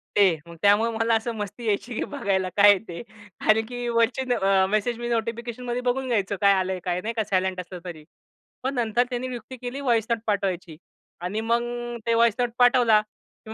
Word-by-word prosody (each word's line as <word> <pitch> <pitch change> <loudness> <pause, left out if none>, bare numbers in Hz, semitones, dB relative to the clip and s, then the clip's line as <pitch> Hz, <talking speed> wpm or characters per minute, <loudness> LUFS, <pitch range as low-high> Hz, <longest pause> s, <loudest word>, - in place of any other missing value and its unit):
ते. 190 -5 +4
मग 170 - -11
त्यामुळे 205 +3 +4
मला 225 0 +2
असं 225 +2 -1
मस्ती 210 +3 -6
यायची 220 +3 -1
की - - -1
बघायला 195 -8 0
काय 205 0 +8
आहे 200 - +6
ते? 170 -1 -7 0.4
कारण 220 +1 +3
की 245 +1 -5
वरचे 230 +2 +1
अ, 195 -3 +3
मेसेज 215 +3 0
मी 240 - -4
नोटिफिकेशनमध्ये 235 +1 -3
बघून 255 +1 -1
घ्यायचो 205 -5 0
काय 200 -1 +6
आलंय 190 -1 -1
काय 180 0 -1
नाही 225 +3 -3
का 225 -1 0
सायलेंट 190 -2 -1
असलं 180 0 -7
तरी. 165 -4 -8 0.6
पण 265 +1 -1
नंतर 240 0 +1
त्याने 250 0 -3
युक्ती 245 +2 -8
केली 250 +2 -6
वॉइस 235 -5 +2
नोट 230 -1 +1
पाठवायची. 185 -5 -2 0.4
आणि 190 +5 -2
मग 235 +1 +1
अ, 240 0 -5
ते 230 - +3
वॉइस 230 -1 +4
नोट 245 -1 +1
पाठवला, 245 -3 +5 0.5
मी 220 - -6
225 Hz, 200 wpm, -25 LUFS, 195-240 Hz, 0.6 s, काय